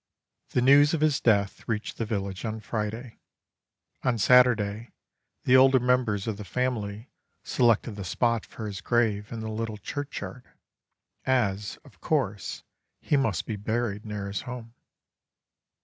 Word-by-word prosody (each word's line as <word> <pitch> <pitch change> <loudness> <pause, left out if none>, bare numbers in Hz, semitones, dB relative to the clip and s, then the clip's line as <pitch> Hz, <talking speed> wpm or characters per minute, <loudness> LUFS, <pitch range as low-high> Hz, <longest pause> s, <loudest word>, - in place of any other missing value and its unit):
The 125 - +1
news 145 +4 +6
of 155 - -3
his 155 -2 +2
death 100 -4 +2
reached 110 -1 -3
the 115 - -1
village 100 -3 -3
on 110 -1 -3
Friday. 110 +2 -4 0.8
On 125 -3 +1
Saturday 115 -2 +4 0.5
the 125 - +4
older 130 0 +7
members 125 -5 +1
of 110 -3 -3
the 105 - -6
family 110 0 -3 0.3
selected 120 -1 +2
the 100 - -5
spot 115 +6 0
for 110 - -8
his 100 -4 -5
grave 110 -3 +1
in 115 - -5
the 110 0 -4
little 110 0 -3
churchyard, 140 +2 -6 0.7
as, 105 -6 0
of - - -18
course, 115 - -1 0.4
he - - 0
must 115 - +1
be 110 - -4
buried 110 0 -2
near 105 -2 -5
his 100 0 -3
home. 120 -2 -8
115 Hz, 145 wpm, -27 LUFS, 105-125 Hz, 0.8 s, older